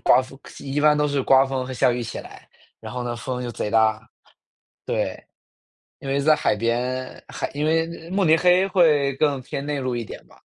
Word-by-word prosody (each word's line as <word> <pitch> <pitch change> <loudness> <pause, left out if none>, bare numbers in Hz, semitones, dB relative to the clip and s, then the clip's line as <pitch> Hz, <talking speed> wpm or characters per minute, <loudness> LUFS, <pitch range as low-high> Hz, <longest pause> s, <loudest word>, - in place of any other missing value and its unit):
刮 130 - +4
风， 130 +1 -13 0.2
一 140 +1 -3
般 150 0 +5
都 150 0 +2
是 140 -2 0
刮 135 +1 +5
风 135 -1 -3
和 130 - -6
下 130 +1 +2
雨 120 - -3
一 - - -3
起 115 - -6
来。 - - -12 0.3
然 - - -8
后 125 - -4
呢， 120 -1 -4
风 125 +1 -4
就 120 - -4
贼 105 - -4
大 110 -1 +3 0.8
对， - - -2 0.8
因 135 - -8
为 140 +1 +1
在 155 +2 +5
海 - - +1
边， 125 +4 -2
海 - - -4
因 145 - -2
为 165 +1 -1
慕 195 0 +1
尼 160 0 +5
黑 180 +2 +4
会 150 -7 +3
更 145 -3 +1
偏 140 +2 -6
内 145 -1 -2
陆 130 -1 -2
一 115 - -3
点 - - -10
吧。 - - -22
135 Hz, 235 characters per minute, -23 LUFS, 125-150 Hz, 0.8 s, 般